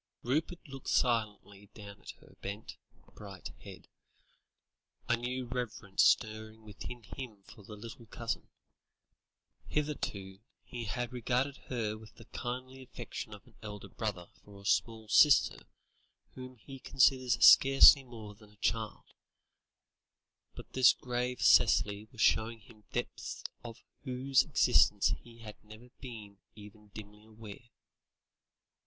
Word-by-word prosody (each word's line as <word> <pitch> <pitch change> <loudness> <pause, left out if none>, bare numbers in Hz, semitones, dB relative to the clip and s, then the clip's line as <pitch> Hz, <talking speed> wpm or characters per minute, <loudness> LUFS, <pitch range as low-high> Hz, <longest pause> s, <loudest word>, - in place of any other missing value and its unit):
Rupert 155 +7 -2
looked 135 -1 -8
silently 105 -4 0
down 100 -2 -11
at - - -13
her - - -19
bent, 100 +3 -6 0.4
bright 100 -3 -9
head, - - -12 1.2
a 120 - +3
new 125 +2 -4
reverence 120 -5 -2
stirring 110 -1 +1
within 110 +3 -9
him 105 -1 -9
for 105 - -15
the 105 +2 -10
little 115 +2 -11
cousin. - - -5 1.2
Hitherto, 100 -11 -3 0.2
he 120 -1 -7
had 120 +5 -4
regarded 125 +3 -1
her 110 -4 -3
with 110 0 -15
the 115 - -15
kindly 130 +2 -6
affection 130 - -8
of - - -17
an - - -21
elder 105 -1 -8
brother 100 -6 -5
for 100 -1 -14
a 100 - -15
small 110 0 0
sister 145 +6 +5 0.7
whom 130 0 -10
he 135 +4 -12
considers 130 -1 +3
scarcely 135 +1 +8
more 110 -4 -10
than 105 0 -19
a 105 - -22
child; 110 +1 -2 1.5
but - - -12
this 130 -1 +6
grave 125 0 -3
Cicely 105 -2 +4
was 115 - -7
showing 110 +1 +2
him 105 0 -19
depths - - -5 0.2
of 115 -1 -10 0.2
whose 130 0 +2
existence 125 -8 +3
he 115 -1 -16
had 105 -2 -11
never 110 +3 -14
been 110 -6 -10 0.2
even 105 0 -14
dimly 105 0 -12
aware. 110 +1 -12
115 Hz, 130 wpm, -32 LUFS, 105-125 Hz, 1.5 s, scarcely